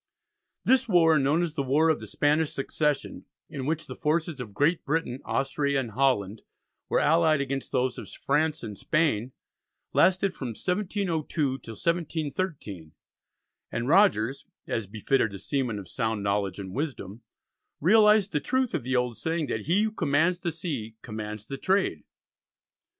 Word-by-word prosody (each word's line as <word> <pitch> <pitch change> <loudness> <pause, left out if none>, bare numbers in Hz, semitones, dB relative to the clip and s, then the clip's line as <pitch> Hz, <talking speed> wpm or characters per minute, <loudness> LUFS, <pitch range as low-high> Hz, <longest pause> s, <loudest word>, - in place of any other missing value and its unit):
This 260 -2 +3
war, 165 -5 +5
known 145 +5 +2
as 165 -3 -2
the 150 - -1
War 145 +5 +3
of 160 - +2
the - - -9
Spanish 150 +1 +1
Succession, 145 +1 -2 0.3
in 140 -4 -4
which 160 0 -1
the - - -8
forces 155 -1 -1
of 115 -4 -6
Great 145 - +1
Britain, 145 -4 -1
Austria, 140 0 0
and 120 -4 -4
Holland 110 -4 +1 0.5
were - - +3
allied 160 -1 +4
against 135 -1 -3
those 130 -1 0
of - - -9
France 155 +2 0
and 105 - -6
Spain, 130 - 0 0.6
lasted 190 +1 +3
from 130 - -5
1702 185 - -2 0.3
till 115 - -9
1713, 155 - -3 0.8
and 120 +1 -2
Rogers, 140 - +3 0.2
as 115 -4 -2
befitted 110 +1 0
a - - -5
seaman 125 0 -2
of 100 -3 -8
sound 110 +1 -2
knowledge 100 -2 0
and 95 -2 -7
wisdom, 120 - -4 0.6
realised 210 +3 +5
the 150 - +1
truth 260 - 0
of - - 0
the 130 +2 -2
old 125 -2 0
saying 165 -1 -1
that 110 -2 -4
he 190 +6 +3
who 220 - 0
commands 165 -1 +1
the 175 -2 -2
sea 145 -10 -5
commands 105 -1 -6
the 135 - -5
trade. 190 - +1
145 Hz, 155 wpm, -27 LUFS, 115-165 Hz, 0.8 s, war